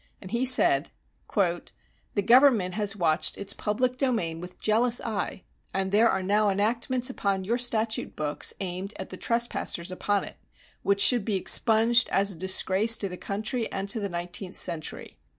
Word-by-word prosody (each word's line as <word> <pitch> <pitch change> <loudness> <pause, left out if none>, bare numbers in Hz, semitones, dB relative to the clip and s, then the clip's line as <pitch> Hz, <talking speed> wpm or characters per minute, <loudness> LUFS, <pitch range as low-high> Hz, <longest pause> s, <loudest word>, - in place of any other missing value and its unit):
He 240 +4 0
said: 155 - +4 0.5
The 185 +1 -3
government 240 -7 +4
has 210 0 -1
watched 165 -4 +1
its 200 0 -3
public 250 +4 -1
domain 220 - -1
with 180 +1 -11
jealous 230 +3 +2
eye, 210 -4 -4 0.3
and 190 0 -1
there 220 +3 +4
are 190 - -1
now 205 +2 +2
enactments 235 +5 0
upon 195 -5 -2
your 235 +6 -1
statute 225 -2 -1
books, 150 -1 -1
aimed 190 +2 -4
at 190 - -7
the 185 - -7
trespassers 230 -7 -1
upon 200 +2 -1
it, - - -10 0.4
which 200 0 +1
should 240 -1 +5
be 210 -1 -1
expunged 225 +4 +4
as 200 +1 +2
a - - -5
disgrace 190 +5 +1
to 200 - -3
the 180 - -7
country 215 +5 -4
and 195 +1 -4
to 225 - +2
the 200 -1 -3
nineteenth 175 +2 -5
century. 155 -2 -3
205 Hz, 165 wpm, -26 LUFS, 185-230 Hz, 0.5 s, should